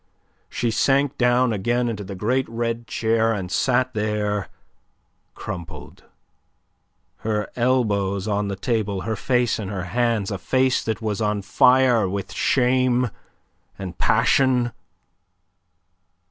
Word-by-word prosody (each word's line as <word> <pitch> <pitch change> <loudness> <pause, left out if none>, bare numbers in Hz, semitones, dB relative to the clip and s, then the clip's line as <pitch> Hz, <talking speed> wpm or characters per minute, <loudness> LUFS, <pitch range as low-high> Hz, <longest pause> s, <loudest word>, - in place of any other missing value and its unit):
She 120 -1 -1
sank 140 +4 +2
down 125 -1 +3
again 120 +4 0
into 105 -3 -4
the 100 0 -7
great 125 +7 0
red 115 0 -3
chair, 115 0 +1
and 95 -4 -4
sat 130 0 +1
there 105 -2 -1 0.9
crumpled, 85 -2 -8 1.1
her 105 -1 -2
elbows 105 -6 0
on 105 -1 0
the 100 - -3
table, 100 -2 -1
her 110 +4 -2
face 125 +2 0
in 105 - -4
her 95 -2 -4
hands 115 -4 +1
a 100 - -3
face 130 +3 +1
that 110 0 -3
was 110 0 -2
on 105 -1 0
fire 125 -1 +4
with 100 0 -4
shame 125 -2 +2 0.7
and 95 -3 -6
passion. 125 -3 +3
115 Hz, 120 wpm, -22 LUFS, 100-125 Hz, 1.1 s, fire